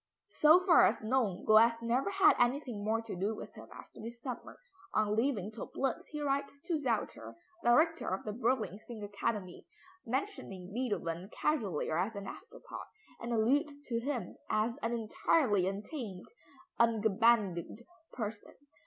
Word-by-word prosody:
So 320 +4 +6
far 350 -3 +7
as - - -1
known, 215 -5 0
Goethe 230 +2 +6
never 245 +9 +1
had 395 +1 +6
anything 245 -3 +1
more 225 +2 0
to 225 - -6
do 200 +5 -1
with - - -9
him - - -11
after - - -12
this 235 +2 -8
summer. 250 0 -7 0.4
On 210 -1 +2
leaving 220 -4 0
Töplitz 245 +3 -3
he 300 -1 -5
writes 280 0 -1
to 325 -1 -1
Zelter, 210 - -2 0.3
Director 315 +7 +3
of 190 - -2
the 210 - -4
Berlin 225 -4 0
Singakademie, 205 -3 -4 0.4
mentioning 225 - -4
Beethoven 195 -7 -2
casually 210 - -1
or 160 - +1
as 200 +5 -1
an 200 -1 -5
afterthought, 465 - -9 0.3
and 235 - -5
alludes 285 +6 +1
to 230 -1 0
him 245 -6 -3
as 215 +2 +1
an 230 -5 -2
"entirely 220 - +2
untamed 200 - -5 0.5
(ungebändigt) 220 -3 +2 0.3
person." 215 -3 -6
230 Hz, 145 wpm, -33 LUFS, 205-265 Hz, 0.5 s, far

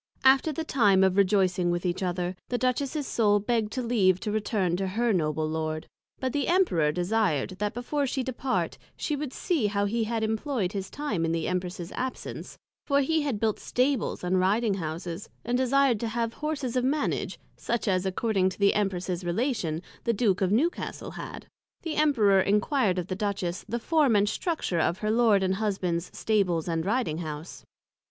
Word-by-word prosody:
After 265 +4 +5
the 320 +2 -3
time 205 -10 +4
of 190 -1 +3
rejoicing 190 -3 +3
with 175 +1 -1
each 175 +1 -1
other, 180 0 -1
the 245 - 0
Duchess's 265 +4 -1
Soul 205 -4 +3
begg'd 220 +1 -1
leave 220 -7 +2
to 210 - -2
return 205 -4 0
to 190 0 -1
her 225 +4 +1
Noble 155 -3 0
Lord: 155 0 -3 0.3
But 260 -1 -2
the 290 - 0
Emperor 335 - +3
desired, 180 -2 0
that 210 0 -1
before 275 +4 -1
she 260 +1 -1
departed, 260 0 -2 0.2
she 300 - -1
would 290 -2 -4
see 295 - 0
how 200 0 0
he 225 +2 0
had 225 0 -1
employed 220 -2 -1
his 195 -1 -4
time 245 - -2
in 165 - +1
the 165 -1 -1
Empress's 180 -1 -3
absence; 255 0 -5 0.3
for 280 -1 +3
he 315 +3 +1
had 275 -8 -2
built 220 -1 0
Stables 255 -5 0
and 180 +1 +2
Riding 205 +4 +2
Houses, 170 +1 -5 0.2
and 240 +1 0
desired 260 -2 +3
to 230 - -2
have 230 0 -2
Horses 285 -5 -3
of 250 - +2
Manage, 285 +4 -1 0.2
such 235 -1 -2
as, 185 -2 +2
according 190 0 +1
to 185 - -9
the 200 0 +4
Empress's 185 -3 -1
Relation, 175 - -1 0.2
the 235 - +2
Duke 200 -4 +1
of 190 - +2
Newcastlehad: 280 - -2 0.4
The 325 -2 -3
Emperor 230 -11 +4
enquired 205 0 +2
of 180 - -1
the 185 - -4
Duchess, 195 -3 -2
the 235 - -1
Form 285 -1 +2
and 205 0 +4
Structure 215 - -1
of 170 +2 +1
her 215 +1 -1
Lord 220 -4 +4
and 190 0 +1
Husband's 185 -5 -1
Stables 185 -7 +1
and 165 +1 -1
Riding 215 -8 0
House. 155 0 -7
210 Hz, 180 wpm, -27 LUFS, 185-250 Hz, 0.4 s, After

